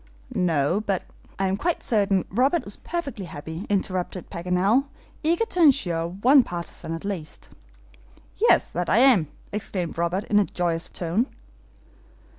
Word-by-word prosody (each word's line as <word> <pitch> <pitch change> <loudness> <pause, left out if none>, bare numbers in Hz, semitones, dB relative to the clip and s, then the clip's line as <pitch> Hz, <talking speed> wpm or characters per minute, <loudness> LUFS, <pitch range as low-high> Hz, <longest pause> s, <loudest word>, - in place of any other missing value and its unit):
"No, 170 +2 +1
but 195 -4 -1 0.2
" - - -25
"I 195 - +1
am 190 - +1
quite 345 +9 -1
certain 200 -5 +2
Robert 270 - +2
is 200 - -3
perfectly 280 - -5
happy," 160 +3 -7
interrupted 185 -2 -2
Paganel, 185 +8 +1 0.4
eager 335 +8 +2
to 365 -5 -2
insure 180 - +3
one 240 +11 +5
partisan 170 -4 -5
at 165 - -8
least. 180 -7 -6 0.9
"Yes, - - +4
that 175 0 -2
I - - +4
am!" 240 - +5 0.2
exclaimed 185 -5 -3
Robert, 175 +4 0
in 210 -1 +3
a 205 - +3
joyous 170 -2 -1
tone. 180 +9 -1
195 Hz, 145 wpm, -25 LUFS, 170-235 Hz, 0.9 s, one